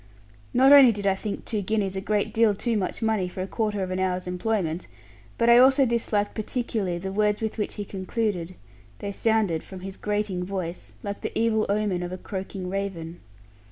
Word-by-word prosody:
Not 265 +3 +6
only 275 -4 +9
did 205 -2 -5
I 195 - +4
think 200 +2 -5
two 215 -2 -1
guineas 200 -1 -1
a 190 - -2
great 205 0 0
deal 225 -2 +4
too 230 +3 -1
much 205 +2 -2
money 220 -4 +1
for 185 +1 -5
a - - -5
quarter 210 -2 -1
of 185 - -4
an 185 - -1
hour's 185 -1 -1
employment, 180 -2 -2 0.5
but 230 - +2
also 260 +3 +7
I - - +4
disliked 225 -3 0
particularly 215 -5 -2
the 190 +2 -5
words 210 +1 +1
with 220 0 -3
which 210 - -2
he 205 - -4
concluded; 190 -2 -3 0.4
they 200 - -4
sounded, 205 -6 +1
from 190 -1 -10
his 190 +1 -7
grating 205 -3 -1
voice, 180 -2 -5
like 200 0 -5
the - - -4
evil 225 -1 +2
omen 200 -3 0
of 175 0 -4
a 185 - -4
croaking 190 0 -6
raven. 180 -3 -4
200 Hz, 195 wpm, -26 LUFS, 185-220 Hz, 0.5 s, only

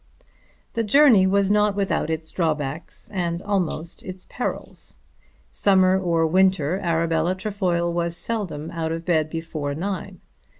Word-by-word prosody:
The 230 - 0
journey 225 -4 +6
was 200 +1 +2
not 210 -1 +3
without 195 -5 0
its 160 0 -3
drawbacks 155 -3 -3
and 170 -3 -1
almost 180 -5 -2
its 185 0 -9
perils. - - -5 0.6
Summer 190 -1 +4
or 170 -3 +2
winter 185 -1 +2
Arabella 165 0 +1
Trefoil 185 -4 -1
was 170 0 -1
seldom 170 -9 -3
out 165 -1 -3
of 165 0 -4
bed 155 -3 +1
before 155 -3 -4
nine. 190 +1 -4
175 Hz, 130 wpm, -23 LUFS, 165-195 Hz, 0.6 s, journey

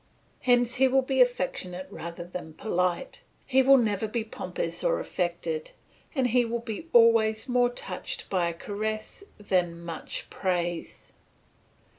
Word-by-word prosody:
Hence 245 0 +3
he 265 +1 +5
will 265 +1 +3
be 265 0 +2
affectionate 185 -6 0
rather 170 -2 -6
than 175 -2 -8
polite, 180 -4 -1 0.2
he 265 0 +4
will 270 +1 +7
never 220 -3 +1
be 225 +1 -2
pompous 355 - -4
or - - +2
affected, 170 -3 -2 0.5
and 265 -3 +2
he 245 +2 +4
will 235 0 -1
be 235 +6 -6
always 230 0 +5
more 245 -1 +3
touched 245 - -6
by 180 -3 +1
a - - -4
caress 215 - -4
than 185 -4 +1
by 170 0 -12
much 160 - -6
praise. 175 -3 -3
220 Hz, 145 wpm, -28 LUFS, 180-245 Hz, 0.5 s, will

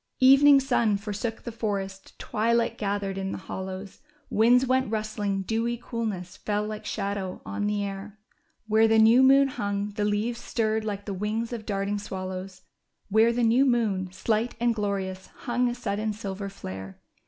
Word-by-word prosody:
143 260 +1 +8
Evening 280 0 +7
sun 235 -6 +2
forsook 210 +2 -4
the 235 - -5
forest, 195 -4 -4
twilight 230 +1 0
gathered 200 -2 -2
in 190 0 -3
the - - -4
hollows; 190 +2 -7 0.3
Winds 245 +4 +5
went 260 -2 +1
rustling, 210 -2 -2
dewy 230 +4 -1
coolness 215 -7 -4
fell 210 0 -1
like 215 0 -6
shadow 200 -2 -3
on 205 0 -2
the 205 -1 0
air; 200 +1 -6 0.5
Where 220 +1 +4
the 225 0 +4
new 225 +3 +7
moon 275 +1 +6
hung, 205 -4 -2
the 205 0 -2
leaves 215 +3 -1
stirred 220 -1 0
like 205 -2 -4
the 200 - -3
wdngs 215 +5 -2
of 225 -3 -6
darting 200 0 -1
swallows; 185 -1 -6 0.5
Where 220 +3 +5
the 240 +1 0
new 235 +4 +4
moon, 215 -8 +1
slight 215 +5 -1
and 240 0 +2
glorious, 195 -3 -3
hung 245 0 +1
a 240 - -3
sud 205 -5 -3
den 215 0 -1
silver 200 -1 -5
flare. 95 - -8
210 Hz, 170 wpm, -26 LUFS, 195-230 Hz, 0.5 s, 143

